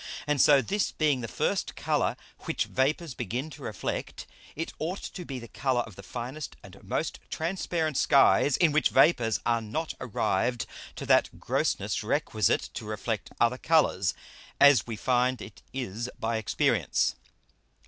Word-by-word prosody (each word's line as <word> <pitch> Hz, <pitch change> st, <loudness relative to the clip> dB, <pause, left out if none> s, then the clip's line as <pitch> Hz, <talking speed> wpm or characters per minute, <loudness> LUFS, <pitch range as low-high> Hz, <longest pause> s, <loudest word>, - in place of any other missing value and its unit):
And 150 Hz, -2 st, +2 dB
so 140 Hz, -2 st, +6 dB
this 200 Hz, -, 0 dB
being 150 Hz, -5 st, +1 dB
the 115 Hz, -, -4 dB
first -, -, -1 dB
Colour -, -, 0 dB, 0.3 s
which -, -, 0 dB
Vapours 145 Hz, +3 st, 0 dB
begin 125 Hz, +7 st, -4 dB
to 145 Hz, -, -11 dB
reflect, 110 Hz, -, -4 dB, 0.3 s
it 165 Hz, +2 st, -4 dB
ought 175 Hz, +5 st, -3 dB
to 180 Hz, -, -7 dB
be 135 Hz, -4 st, -5 dB
the 120 Hz, -1 st, -8 dB
Colour 130 Hz, +2 st, 0 dB
of 110 Hz, -5 st, -9 dB
the 100 Hz, -, -10 dB
finest 125 Hz, +8 st, -6 dB
and -, -, -14 dB
most -, -, -2 dB
transparent 165 Hz, -3 st, -1 dB
Skies, 140 Hz, 0 st, +5 dB
in 170 Hz, -4 st, +4 dB
which 155 Hz, +1 st, +3 dB
Vapours 115 Hz, -10 st, +4 dB
are 115 Hz, -1 st, +2 dB
not 115 Hz, +10 st, -3 dB
arrived 120 Hz, 0 st, 0 dB, 0.3 s
to -, -, -6 dB
that -, -, +3 dB
Grossness -, -, 0 dB
requisite -, -, 0 dB
to -, -, -6 dB
reflect 110 Hz, +1 st, -3 dB
other 120 Hz, +2 st, +2 dB
Colours, 150 Hz, -, +2 dB, 0.4 s
as 145 Hz, -3 st, +6 dB
we 115 Hz, -, -4 dB
find 125 Hz, +2 st, +1 dB
it 105 Hz, -1 st, -11 dB
is 120 Hz, -2 st, -4 dB
by 115 Hz, 0 st, -1 dB
Experience. 110 Hz, -, +1 dB
130 Hz, 155 wpm, -28 LUFS, 115-155 Hz, 0.4 s, so